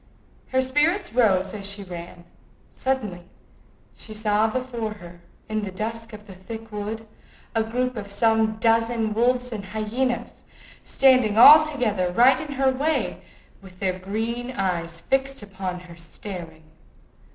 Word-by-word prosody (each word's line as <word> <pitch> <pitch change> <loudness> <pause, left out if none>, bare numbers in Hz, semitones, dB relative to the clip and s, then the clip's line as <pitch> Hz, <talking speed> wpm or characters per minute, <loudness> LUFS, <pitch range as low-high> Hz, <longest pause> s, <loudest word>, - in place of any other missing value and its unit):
Her 260 0 +1
spirits 300 - +1
rose 200 -6 +2
as 200 -1 -4
she 200 0 -3
ran. 175 -1 -9 0.5
Suddenly 230 -10 -2 0.7
she 215 - -9
saw 215 0 +2
before 235 -2 -3
her, 175 -4 -13 0.3
in 215 0 -2
the 205 - -4
dusk 225 +4 -5
of 210 -1 -11
the 195 - -11
thick 220 +4 -9
wood, 210 +2 -5 0.5
a 225 - +2
group 250 +3 -2
of 205 -2 -6
some 220 +1 +2
dozen 230 0 +1
wolves 245 +2 +1
and 210 -3 -5
hyenas, 220 +5 -3 0.4
standing 255 -6 +3
all 305 +6 +10
together 220 -12 -1
right 255 +7 +5
in 300 -2 -6
her 270 -1 +2
way, 295 +5 -1 0.4
with 185 -2 -15
their 185 -1 -1
green 225 +6 -3
eyes 175 -7 -2
fixed 270 0 -1
upon 190 -3 -5
her 175 -1 -13
staring. 165 -1 -9
220 Hz, 140 wpm, -24 LUFS, 195-250 Hz, 0.7 s, all